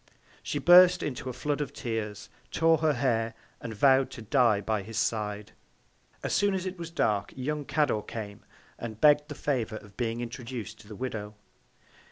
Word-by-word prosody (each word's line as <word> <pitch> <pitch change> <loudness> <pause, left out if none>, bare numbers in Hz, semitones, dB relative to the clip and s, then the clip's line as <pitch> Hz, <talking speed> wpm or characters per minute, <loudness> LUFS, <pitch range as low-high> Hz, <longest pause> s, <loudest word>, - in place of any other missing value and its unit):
She - - -3
burst 180 0 +7
into 130 -2 -4
a - - -2
Flood 145 +4 -2
of 145 - -4
Tears; 110 -3 -4 0.2
tore 165 -1 +3
her 155 -1 +2
Hair; 115 -3 0 0.3
and 115 - -5
vow'd 130 +3 +4
to 115 - -8
die 115 -2 +3
by 105 +1 -1
his 110 +3 -7
Side. 105 -2 -1 0.7
As - - -1
soon 200 -1 +2
as 185 -1 -3
it 185 -1 -5
was 170 -1 -5
dark, 105 - 0
young 145 +3 -3
Cador 145 -9 +1
came, 105 -2 -7 0.4
and 110 -2 -6
begg'd 150 +1 +5
the 145 - -6
Favour 120 -8 -1
of 105 -2 -11
being 115 -2 -1
introduc'd 120 -2 -6
to - - -15
the 105 - -9
Widow. 105 -4 -5
120 Hz, 180 wpm, -28 LUFS, 110-150 Hz, 0.7 s, burst